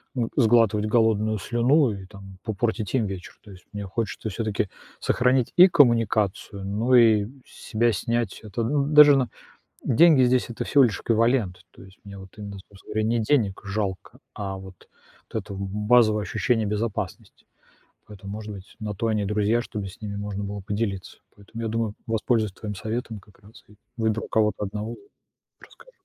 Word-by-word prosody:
ну, 120 -3 -1
сглатывать 110 -4 +3
голодную 110 -1 +2
слюну 125 +6 +2
и, 95 -2 -8
там, 95 -2 -13
по 110 - -3
портить 110 +1 -2
им 115 -4 +2
вечер. 95 -2 -7
То 105 - -13
есть, 90 -2 -15
мне 105 0 -5
хочется 110 +2 -4
всё-таки 105 -2 -2 0.3
сохранить 125 0 +1
и 180 +1 +9
коммуникацию, 110 - +2
ну, 110 +6 +1
и 110 -4 +5 0.2
с - - -21 0.2
себя 115 +2 +2
снять 115 +1 -2
это 110 +2 -4
Ну, 140 +4 +1
даже, 150 -1 +8
на 125 -3 0 0.5
Деньги 145 0 +5
здесь- 125 0 +1
это 115 - -4
всего 140 - +4
лишь 110 - -1
эквивалент. 115 -5 +1
То - - -16
есть, 95 0 -16
мне 100 -1 -10
вот 95 - -11
именно, 100 -2 -8
собственно 100 -1 -14
говоря, 110 - 0
не 120 0 +1
денег 110 -5 +1
жалко, 100 -2 -4 0.2
а 95 -2 -5
вот 95 -2 -13 0.4
это 105 -2 -5
базовое 105 +3 +2
ощущение 110 +3 0
безопасности. 105 +1 -4 0.6
Поэтому, 100 -1 -10
может 105 0 -6
быть, 95 0 -12
на 105 -1 -3
то 115 +3 -2
они 105 -2 0
и - - -1
друзья, 105 +3 +1
чтобы 105 -5 -6
с 100 +5 -14
ними 105 -2 -5
можно 100 0 -4
было 100 0 -5
поделиться. 100 -1 -4 0.2
Поэтому, 110 +3 -9
я 115 - -2
думаю, 110 -1 -2
воспользуюсь 110 -2 0
твоим 105 +2 -6
советом 110 +1 -5
как 100 +1 -23
раз 105 +2 -17
и 105 - -19 0.2
выберу 110 -1 -1
кого-то 105 -1 +1
1- 105 +3 -5
и 200 - -22 0.4
расскажу. - - -19
110 Hz, 175 wpm, -24 LUFS, 100-115 Hz, 0.6 s, и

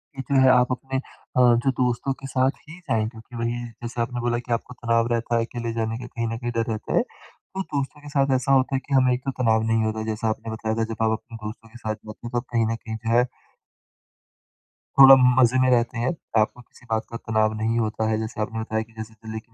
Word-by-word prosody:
ये 135 - -4
जो 135 - +5
है 130 - +6
आप 125 0 +4
अपने 135 +1 -2
अ, 130 -1 -6
जो 120 +1 +5
दोस्तों 125 +1 0
के 135 - -7
साथ 130 0 +2 0.2
ही 170 +3 -10
जाएँगे 110 -10 -1
क्योंकि 115 +1 -13
वही 120 +1 -2 0.2
जैसे 120 0 -3
आपने 120 +1 -2
बोला 120 0 0
कि 120 0 -9
आपको 120 +2 -3
तनाव 115 -1 +1
रहता 120 0 0
है, 115 - +1
अकेले 115 -1 -4
जाने 115 0 -2
का 125 0 -7
कहीं 115 -1 -3
न 115 0 -3
कहीं 120 0 -3
डर 115 -1 0
रहता 110 -1 -4
है। - - +5
तो 190 - -10
दोस्तों 145 -3 -4
के 145 - -10
साथ 140 -1 +2
ऐसा 130 +1 0
होता 135 0 +3
है - - +1
कि 140 - -3
हमें 130 -1 +5
एक 125 - -2
तो 135 - 0
तनाव 110 -2 +3
नहीं 115 0 +2
होता 110 0 -1
है, 110 - -3
जैसा 110 +1 -2
आपने 110 +1 -4
बताया 110 0 -2
था 115 - 0
जब 115 - -2
आप 110 - +3
अपने 115 - -11
दोस्तों 115 +1 -8
के 115 - -13
साथ 110 -2 -3
जाते 110 0 -12
हैं - - -8
तो 120 - -1
आप 120 - -2
कहीं 115 -1 +3
न - - 0
कहीं 110 0 -7
जो 115 0 -3
है 125 +1 +4 1.7
थोड़ा 135 0 +11 0.2
मज़े 130 0 +5
में 130 0 +4
रहते 120 -1 +2
हैं। 120 +2 +1 0.3
आपको 115 +3 -2
किसी 120 - -21
बात 110 0 0
का 115 - -4
तनाव 110 -1 +1
नहीं 115 +1 +1
होता 110 0 -1
है। 110 - +1
जैसे 110 0 -4
आपने 110 +1 -3
बताया 110 0 -1
कि 115 +1 -22
जैसे 110 0 -7
दिल्ली 110 0 -7
के 110 - -23
115 Hz, 260 wpm, -24 LUFS, 110-125 Hz, 1.7 s, थोड़ा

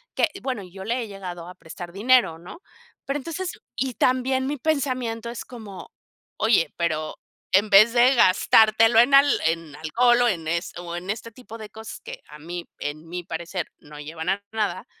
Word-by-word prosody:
que, 325 - +2
bueno, 255 -5 -3
yo 190 +1 -10
le 240 +3 -1
he - - -7
llegado 180 -4 -8
a 180 - -11
prestar 170 +2 -10
dinero, 225 -5 +3
¿no? 185 - -12 0.4
Pero 275 - -2
entonces, 345 +6 -4 0.3
y 260 -2 -1
también 260 +1 +1
mi 290 +1 -2
pensamiento 255 -6 -1
es 235 - -6
como, 220 -6 -10 0.5
oye, 210 -8 +2
pero 155 -2 -2 0.4
en 205 +3 +4
vez 215 +4 +7
de 250 +2 +5
gastártelo 220 +3 +5
en 260 +4 +5
al 280 +1 +7 0.2
en 165 -2 -1
alcohol 240 +10 +3
o - - +4
en 165 -5 -3
es 170 +1 -2
o 175 -1 -6
en 180 +2 -8
este 230 +2 -4
tipo 225 -1 -11
de 215 -1 -9
cosas 220 +1 -9
que - - -9
a 150 0 -13
mí 170 +2 -6
en 155 +2 -5
mi 175 0 -5
parecer 170 0 -5
no 150 0 -13
llevan 160 +2 -7
a 200 +1 -1
nada, 215 -2 -2
210 Hz, 190 wpm, -24 LUFS, 170-245 Hz, 0.5 s, vez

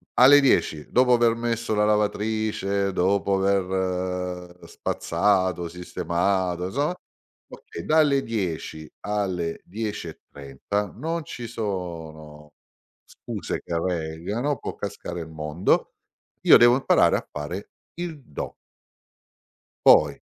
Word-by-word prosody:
alle 140 +3 +8
10, 80 - +2
dopo 125 0 +4
aver 120 -1 +4
messo 115 -1 -2
la 105 0 +3
lavatrice, 105 -2 0
dopo 100 +2 +2
aver 90 -2 -1
spazzato, 90 -1 0
sistemato, 90 +1 -1
insomma 145 - -1 0.5
okay 85 - -9
dalle 150 -3 +3
10 85 -7 -4 0.2
alle 95 -5 -2
10.30 100 -3 -5
non 165 +6 -3
ci 120 -3 -7
sono 80 -8 -6 0.5
scuse - - -6
che 85 -1 -2
reggano, 90 - -2
può - - -6
cascare 90 -3 -5
il 80 - -8
mondo, 80 +3 0 0.5
io - - +9
devo 120 +1 +6
imparare 130 - +4
a - - -7
fare 80 +7 -6 0.3
il 165 -4 -5
do. 95 - -6 1.3
Poi 75 -2 +6
95 Hz, 105 wpm, -24 LUFS, 85-115 Hz, 1.3 s, io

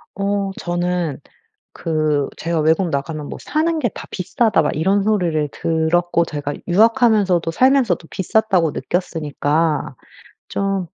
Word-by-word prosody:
어 200 0 -1
저는 175 -4 -2 0.5
그 155 -3 0
제가 165 0 -1
"외국 160 +3 +2
나가면 150 +1 -3
뭐 - - -7
사는 320 +2 0
게 245 - +1
다 - - -9
비싸다." 210 +2 +1
막 150 - -1
이런 190 +6 +2
소리를 175 -8 +1
들었고 170 +1 +1
제가 145 -2 -4 0.2
'유학하면서도 210 -4 +3
살면서도 245 -5 +2
비쌌다.'고 190 -4 +1
느꼈으니까 150 -1 -1 0.5
좀 195 -2 -1
175 Hz, 275 characters per minute, -19 LUFS, 160-200 Hz, 0.5 s, 유학하면서도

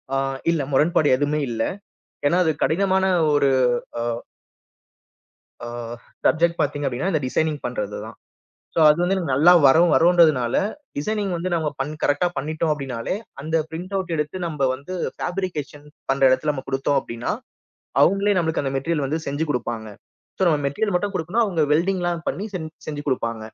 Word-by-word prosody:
ஆ. - - +2 0.3
இல்ல 165 -3 0
முரண்பாடு 150 +2 +3
எதுவுமே 145 +2 0
இல்ல. 115 -1 -3 0.7
ஏன்னா, 175 +5 +3
அது 160 - +2
கடினமான 190 +2 +2 0.3
ஒரு 140 -1 +3 0.5
அ - - -1 1.6
அ. - - -6 0.6
சப்ஜெக்ட் 170 +1 +3
பாத்தீங்க 145 -1 -1
அப்படின்னா, 135 +9 -1
இந்த 155 -5 +1
டிசைனிங்க் 155 +2 -1
பண்றதுதான். - - -4 0.6
சோ, - - +2
அது 150 - +4
வந்து, 190 +2 +1 0.2
நல்லா 155 +7 +6 0.2
வரும் 165 +5 +5
வருன்றதுனால 160 -8 +4 0.4
டிசைனிங்க் 200 +3 -1
வந்து 180 +2 -3
நம்ம 160 -2 -1
பண் 145 +3 -3
கரெக்ட்டா 145 +5 +2
பண்ணிட்டோம். 155 +3 -1
அப்டின்னாலே, 135 -2 -4 0.3
அந்த 160 +3 -2
பிரிண்டவுட் 185 +2 -4
எடுத்து 150 +3 -2
நம்ம 150 -5 0
வந்து 140 +8 -9 0.2
ஃப்பேப்ரிகேஷன் 165 -6 -4 0.3
பண்ற 135 0 0
இடத்துல 130 +4 +2
நம்ம 130 - -6
குடுத்தோம். 135 +1 +1
அப்டின்னா, 115 +1 -4 0.7
அவங்களே 200 +1 +3
நமக்கு 160 -2 -1
அந்த 135 -1 -2
மெட்டீரியல் 145 +1 -1
வந்து 155 +4 -2
செஞ்சு 145 +3 -1
குடுப்பாங்க. 115 -4 -3 0.5
சோ, - - -1
நம்ம 155 -3 +3
மெட்டீரியல் 180 +9 -1
மட்டும் 200 +2 -2
குடுக்கணும். 185 +7 +1
அவங்க 180 -7 0
வெல்டிங்லாம் 175 0 0
பண்ணி 200 - -3
செஞ் 160 -3 -6 0.2
செஞ்சு 145 -1 -5
குடுப்பாங்க. 115 -4 -1
155 Hz, 150 wpm, -22 LUFS, 140-175 Hz, 1.6 s, நல்லா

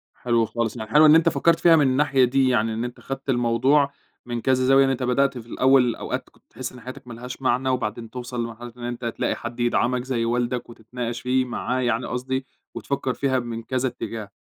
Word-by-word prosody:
حلو 115 -2 +1
خالص، 115 0 -2
يعني 110 -1 -6
حلو 150 +5 +6
إن 155 +1 +8
أنت 165 0 +5
فكّرت 165 0 +2
فيها 170 -1 +6
من 145 -4 +4
الناحية 135 0 +3
دي 130 +1 +2
يعني، 115 -3 +1
إن 115 +2 -3
أنت 120 0 -6
خدت 135 +1 -7
الموضوع 130 +4 +2 0.3
من 120 -1 -4
كذا 130 0 +2
زاوية، 135 +1 +5
إن 135 - +1
أنت 130 -1 -1
بدأت 130 +1 +1
في 115 - -9
الأول 130 -2 +3
أوقات - - -5
كنت - - -29
تحس 130 -1 -6
إن 125 -2 -13
حياتك 130 0 -10
ما 120 - -8
لهاش 125 +3 -8
معنى، 130 0 +1
وبعدين 115 -3 -2
توصل 125 -1 -5
لمرحلة 115 +1 -8
إن 120 - -10
أنت 120 0 -5
تلاقي 115 - -1
حد 120 - -7
يدعمك 120 +1 +1
زي 125 -3 -1
والدك، 120 +1 -1
وتتناقش 120 +1 -6
فيه 130 0 +1
معاه 125 +1 -2
يعني 120 0 0
قصدي، 130 +1 -3 0.3
وتفكّر 135 -2 -2
فيها 130 -1 0
من 115 -1 -5
كذا 130 +2 -1
اتجاه، 115 -3 -6
125 Hz, 215 wpm, -23 LUFS, 120-130 Hz, 0.3 s, إن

